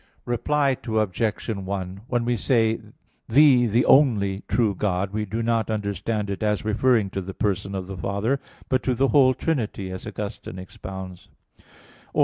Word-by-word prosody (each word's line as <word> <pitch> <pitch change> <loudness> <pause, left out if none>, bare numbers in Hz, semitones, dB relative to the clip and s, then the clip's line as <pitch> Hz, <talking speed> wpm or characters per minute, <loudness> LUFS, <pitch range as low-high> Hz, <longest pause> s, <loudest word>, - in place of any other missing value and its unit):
Reply 135 +3 +1
Obj. 110 -1 -1
1: 95 -2 -4
When 120 -2 0
we 120 0 +1
say, 115 0 +2 0.5
"Thee 130 -1 +6
the 115 +4 +2
only 105 -9 +4
true 110 -4 +2
God," 95 0 -1
we 105 0 -1
do 110 +3 -3
not 115 -1 +1
understand 105 0 -2
it 100 - -4
as 105 -1 0
referring 110 -2 +2
to 95 - -3
the 95 +1 -7
person 100 -1 -1
of 95 -1 -3
the 95 +1 -7
Father, 100 +9 -1 0.3
but 130 -1 +1
to 130 - 0
the 135 +3 +2
whole 130 -3 +5
Trinity, 110 - -2
as 95 - -7
Augustine 100 -3 -6
expounds 95 0 -8 0.3
(De - - -24
Trin. - - -29
105 Hz, 165 wpm, -24 LUFS, 95-120 Hz, 0.5 s, Thee